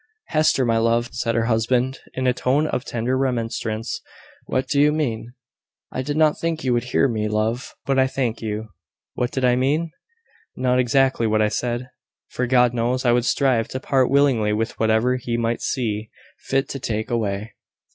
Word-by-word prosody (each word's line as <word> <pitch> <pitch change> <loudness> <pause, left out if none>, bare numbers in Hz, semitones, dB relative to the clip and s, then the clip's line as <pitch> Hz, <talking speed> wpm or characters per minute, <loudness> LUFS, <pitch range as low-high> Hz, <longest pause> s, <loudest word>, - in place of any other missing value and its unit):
"Hester! 155 -4 +3
my 115 -1 +2
love!" 115 +1 +1
said 115 -2 -1
her 115 -1 +1
husband, 120 +3 +1 0.2
in 130 - -2
a 125 - +3
tone 130 +4 +1
of 130 -5 -2
tender 120 0 -2
remonstrance, 115 -4 -2 0.5
"what 130 +1 -1
do 140 0 +2
you 150 +1 +5
mean?" 120 -6 -2 0.6
"I 130 - -3
did 145 +3 -3
not 155 -1 +3
think 165 -1 -2
you 130 -2 +1
would 120 0 0
hear 130 +2 +2
me, 110 -4 -1
love; 110 +4 -2
but 135 -1 +1
I 130 - +4
thank 125 -4 -2
you. 110 0 -4 0.4
What 125 - -1
did 130 0 -1
I 125 -1 +4
mean? 150 +6 0 0.6
Not 125 0 +1
exactly 125 -1 +2
what 110 0 +2
I 105 - +2
said; 120 +3 -3 0.4
for 125 - -2
God 125 -1 +4
knows, 125 +2 -1
I 120 - +5
would 120 0 +2
strive 130 -6 +2
to 130 - -5
part 130 -1 +2
willingly 130 -6 +3
with 110 +2 -2
whatever 110 +3 +2
he 120 -1 -3
might 115 0 -1
see 110 -3 -2 0.3
fit 135 +1 -1
to 135 - -4
take 110 0 -3
away. 105 -2 -2
125 Hz, 185 wpm, -22 LUFS, 115-130 Hz, 0.6 s, you